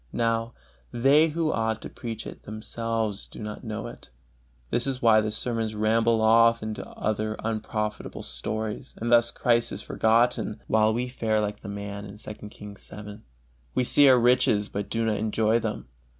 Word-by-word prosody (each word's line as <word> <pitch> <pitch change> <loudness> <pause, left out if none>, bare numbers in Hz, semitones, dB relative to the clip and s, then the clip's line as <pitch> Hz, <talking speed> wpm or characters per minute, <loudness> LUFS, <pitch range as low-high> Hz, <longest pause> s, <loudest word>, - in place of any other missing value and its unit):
Now, 115 0 0 0.4
they 140 +6 +5
who 160 0 0
ought 110 -1 0
to - - -5
preach 115 -2 -6
it, - - -9
themselves 110 -1 -3
do - - -14
not 105 -1 -6
know 110 -3 -5
it. - - -10 0.6
This 120 - 0
is 135 -2 -1
why 110 -3 +5
the 110 - -1
sermons 110 0 -1
ramble 110 +1 +2
off 115 +1 +5
into 110 -1 -4
other 110 0 -2
unprofitable 110 -1 -3
stories, 105 - -4
and 120 +1 -2
thus 120 0 +5
Christ 120 -1 +1
is 100 - -4
forgotten, 115 0 +1
while 110 0 +3
we 120 +3 -1
fare 110 -3 0
like 105 0 -2
the - - -8
man 100 0 -6
in 100 - -9
II. 105 0 -9
Kings 105 -1 -11
vii: 105 0 -9 0.6
we 130 - +2
see 140 +3 +6
our 130 - +7
riches 115 -4 +3
but 100 0 -4
do 115 0 0
not 110 -2 +1
enjoy 110 +1 +1
them. - - -4
110 Hz, 175 wpm, -26 LUFS, 105-115 Hz, 0.6 s, our